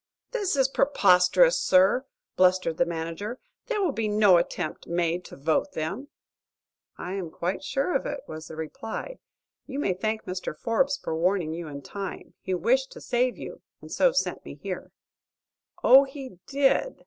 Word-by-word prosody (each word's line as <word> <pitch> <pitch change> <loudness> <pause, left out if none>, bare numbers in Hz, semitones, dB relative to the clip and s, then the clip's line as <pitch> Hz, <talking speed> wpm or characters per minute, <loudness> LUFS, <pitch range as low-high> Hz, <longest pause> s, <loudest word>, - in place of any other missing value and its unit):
"This 415 -9 0
is 270 -1 +3
preposterous, 270 - +4
sir!" 190 +8 +4 0.3
blustered 185 -3 +3
the 175 - +2
manager. 170 +8 -4 0.3
"There 435 -5 0
will 350 - +2
be 225 -4 -2
no 210 -3 +5
attempt 170 -1 -3
made 170 +1 0
to - - -10
vote 155 +3 0
them." 195 - -4 0.9
"I 180 - -5
am 190 -4 -4
quite 180 +4 -3
sure 275 - -1
of - - 0
it," 285 -1 -4
was 155 0 -8
the - - -9
reply. 220 - -6 0.5
"You 275 -1 -5
may 285 -10 +1
thank 215 +4 -2
Mr. 180 -4 -5
Forbes 270 +5 +1
for 160 - -4
warning 170 -1 +1
you 170 0 -6
in 140 -1 -8
time. 195 -2 -7
He 185 - -2
wished 255 +9 +1
to - - -10
save 245 +1 0
you, - - -8 0.2
and - - -13
so - - +4
sent - - -1
me - - -9
here." - - -6 0.9
"Oh, 270 +2 +8
he 270 -8 -10
did!" 280 - +1
200 Hz, 170 wpm, -26 LUFS, 175-270 Hz, 0.9 s, Oh